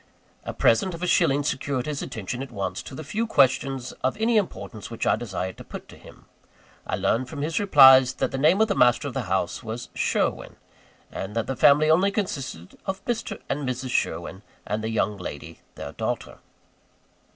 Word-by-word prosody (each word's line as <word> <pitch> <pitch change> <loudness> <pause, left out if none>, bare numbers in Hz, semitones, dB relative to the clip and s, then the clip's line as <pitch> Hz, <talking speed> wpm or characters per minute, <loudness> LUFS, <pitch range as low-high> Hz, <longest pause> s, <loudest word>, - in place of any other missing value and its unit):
A - - -3
present 140 +11 +2
of 170 - -8
a - - +2
shilling 145 -4 +3
secured 135 -2 -2
his 150 -2 -3
attention 110 +4 -5
at 135 - -6
once 95 -4 -4
to - - -10
the 155 - -7
few 215 +10 -2
questions 135 - +2
of 130 - 0
any 225 +2 +1
importance 175 - -2
which 115 - -4
I - - +4
desired 95 -5 -5
to - - -8
put - - -9
to - - -12
him. - - -16 0.6
I - - -1
learned 115 +7 0
from 140 - -5
his 160 +2 -1
replies, 135 -9 +7
that - - -1
the 135 - -3
name 165 +9 +4
of 220 - +4
the - - +1
master 125 +3 +3
of 135 - -5
the 125 -7 -4
house 95 -2 -1
was 115 0 -6
"Sherwin:" - - -1 0.6
and 95 +3 -6
that 115 - 0
the 135 - -3
family 150 +4 +5
only 185 +5 +4
consisted 135 - -4
of 190 0 -4
Mr. 235 -2 -3
and 140 -2 -2
Mrs. 130 0 -4
Sherwin, 85 +1 -2 0.2
and 105 +1 -3
the 110 - -2
young 105 -2 0
lady, 85 -6 -8 0.2
their - - -7
daughter. - - -4
130 Hz, 195 wpm, -25 LUFS, 110-155 Hz, 0.6 s, replies